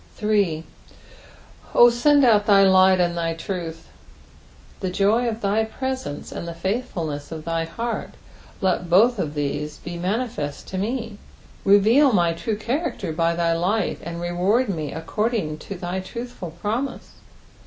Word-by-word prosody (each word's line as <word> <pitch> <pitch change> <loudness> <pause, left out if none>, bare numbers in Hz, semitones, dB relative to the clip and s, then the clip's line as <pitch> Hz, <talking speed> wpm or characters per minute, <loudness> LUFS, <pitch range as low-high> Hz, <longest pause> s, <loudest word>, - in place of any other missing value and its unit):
8. 200 -7 +1 1.1
"0 240 0 +7
tend 285 +4 +4
out 210 -3 +4
thy 200 -2 +6
light 190 -1 +5
and 175 -1 +1
thy 165 -1 -1
truth." 165 -2 -5 0.9
The 190 - -2
joy 205 +6 +2
o( 230 - 0
thy 215 0 0
presence 260 - -5
and 170 - -6
the 170 - -5
fldthfulness 170 - -3
of 160 -1 -7
thy 165 0 -1
heart; 230 +8 -4 0.5
let 180 -2 0
both 220 +6 +5
of 155 -4 -2
these 150 +1 -3
be 175 0 -7
manifeat 190 - -3
to 190 - -4
me. 225 0 -3 0.4
Beveal 220 +7 +5
my 170 -2 +3
true 210 +5 -3
cbamcter 235 - -3
by 165 0 +1
thy 170 -1 +1
light, 185 +4 0
and 170 +1 -6
reward 185 +8 +1
me 155 -6 -3
according 165 -1 -2
to 200 - -7
thy 180 +1 -4
truthful 235 -1 -7
promise. 210 - -4
190 Hz, 145 wpm, -23 LUFS, 170-225 Hz, 1.1 s, 0